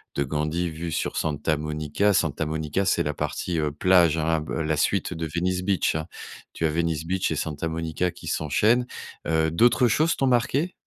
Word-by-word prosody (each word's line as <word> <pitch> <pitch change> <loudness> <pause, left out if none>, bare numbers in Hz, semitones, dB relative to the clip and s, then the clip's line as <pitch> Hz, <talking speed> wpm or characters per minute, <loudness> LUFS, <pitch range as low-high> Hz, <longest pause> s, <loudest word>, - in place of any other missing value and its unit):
de 70 - +1
Gandhi 75 +5 -1
vue 80 +1 -5
sur - - -2
Santa 75 0 0
Monica. 75 +6 0
Santa 80 -2 0
Monica, 80 +4 -1
c'est - - +2
la 75 0 -2
partie, 80 +3 -2
heu, 75 -1 0
plage, 85 0 +4
hein, 80 0 +1
b 75 - -7
la 80 -1 -1
suite - - 0
de 80 0 -4
Venice 90 +1 0
Beach, 95 -5 +1
hein. 80 0 -2 0.5
Tu - - -5
as - - +3
Venice 80 0 -1
Beach 95 +2 -1
et - - 0
Santa 80 +1 -3
Monica 80 +2 -2
qui - - -12
s'enchaînent. 110 - +2 0.4
Heu, 80 0 +2
d'autres 120 +6 +4
choses 160 +6 +2
t'ont 135 - +1
marquées? 130 +8 +1
80 Hz, 195 wpm, -25 LUFS, 75-90 Hz, 0.5 s, plage